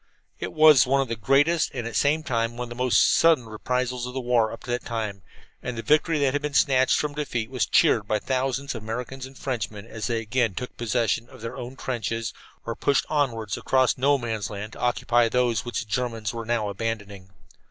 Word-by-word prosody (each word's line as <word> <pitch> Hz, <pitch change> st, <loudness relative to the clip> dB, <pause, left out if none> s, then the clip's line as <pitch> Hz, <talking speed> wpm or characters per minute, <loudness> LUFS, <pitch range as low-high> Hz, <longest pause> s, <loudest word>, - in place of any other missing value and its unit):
] -, -, -46 dB
It -, -, -4 dB
was 155 Hz, -5 st, +6 dB
one 135 Hz, +1 st, +3 dB
of 135 Hz, -3 st, 0 dB
the 115 Hz, -, -1 dB
greatest 145 Hz, +9 st, +3 dB
and 120 Hz, -3 st, -3 dB
at 115 Hz, -, -4 dB
the -, -, -9 dB
same 150 Hz, +2 st, +2 dB
time 115 Hz, -3 st, -1 dB
one 125 Hz, -, -3 dB
of -, -, -12 dB
the 120 Hz, +1 st, -3 dB
most 125 Hz, -, +4 dB
sudden 160 Hz, -7 st, +4 dB
reprisals 125 Hz, +3 st, -2 dB
of 125 Hz, -, -8 dB
the -, -, -1 dB
war 120 Hz, -3 st, +2 dB
up 115 Hz, -, -9 dB
to 120 Hz, -, -5 dB
that 120 Hz, -, -1 dB
time, 110 Hz, -4 st, -4 dB, 0.4 s
and 125 Hz, -2 st, -5 dB
the 115 Hz, -, -4 dB
victory 155 Hz, +1 st, +3 dB
that 140 Hz, -3 st, +2 dB
had 145 Hz, -, 0 dB
been 150 Hz, -1 st, -4 dB
snatched 130 Hz, -1 st, +4 dB
from 150 Hz, -1 st, -1 dB
defeat 125 Hz, -6 st, -3 dB
was 130 Hz, -, 0 dB
cheered 105 Hz, -3 st, +3 dB
by 110 Hz, -, +1 dB
thousands 135 Hz, +4 st, -1 dB
of 115 Hz, -, -6 dB
Americans 125 Hz, +4 st, -5 dB
and 135 Hz, 0 st, -15 dB
Frenchmen 110 Hz, -5 st, -4 dB
as 115 Hz, -2 st, -5 dB
they 115 Hz, -2 st, 0 dB
again 115 Hz, -2 st, 0 dB
took 125 Hz, +7 st, -6 dB
possession 120 Hz, 0 st, 0 dB
of -, -, -14 dB
their 115 Hz, -, -5 dB
own 125 Hz, +2 st, -7 dB
trenches, 115 Hz, -4 st, -3 dB, 0.3 s
or 115 Hz, -, -2 dB
pushed 140 Hz, -, +1 dB
onward 120 Hz, -9 st, 0 dB
across 130 Hz, -1 st, +2 dB
No 140 Hz, +2 st, +3 dB
Man's 115 Hz, -6 st, -3 dB
Land 105 Hz, +2 st, -6 dB
to -, -, -11 dB
occupy 120 Hz, -1 st, +2 dB
those 120 Hz, -1 st, +1 dB
which 120 Hz, -, -2 dB
the -, -, -8 dB
Germans 115 Hz, -2 st, -2 dB
were 115 Hz, -1 st, -5 dB
now 115 Hz, -3 st, 0 dB
abandoning. 100 Hz, -2 st, -5 dB
120 Hz, 225 wpm, -25 LUFS, 115-130 Hz, 0.4 s, was